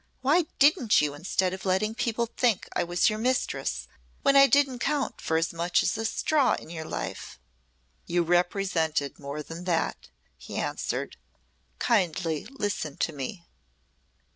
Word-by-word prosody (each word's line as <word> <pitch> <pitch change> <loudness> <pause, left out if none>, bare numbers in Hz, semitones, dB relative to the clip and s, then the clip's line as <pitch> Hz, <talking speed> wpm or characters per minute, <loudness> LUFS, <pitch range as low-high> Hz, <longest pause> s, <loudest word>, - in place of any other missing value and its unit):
Why 305 +6 +3
didn't 280 - +5
you 150 -1 +1
instead 180 +4 -1
of 190 - -7
letting 195 +3 +1
people 235 0 -1
think 230 -3 0
I - - +2
was 175 0 +2
your 215 0 0
mistress 140 - -1 0.4
when 275 - +4
I 275 0 +8
didn't 275 -3 +3
count 290 +1 -1
for 160 - 0
as 165 +1 0
much 170 +1 +1
as - - +1
a 225 +1 -3
straw 265 +4 +2
in - - -10
your 160 -2 -6
life?" 95 - -6 0.7
"You 175 0 +2
represented 175 -4 0
more 145 +1 -5
than 165 +4 -8
that," 170 -3 -1 0.3
he - - -9
answered. - - -3 0.6
"Kindly 175 -8 0
listen 205 - -3
to 160 - -1
me." 150 +6 -6
185 Hz, 150 wpm, -27 LUFS, 160-235 Hz, 0.7 s, I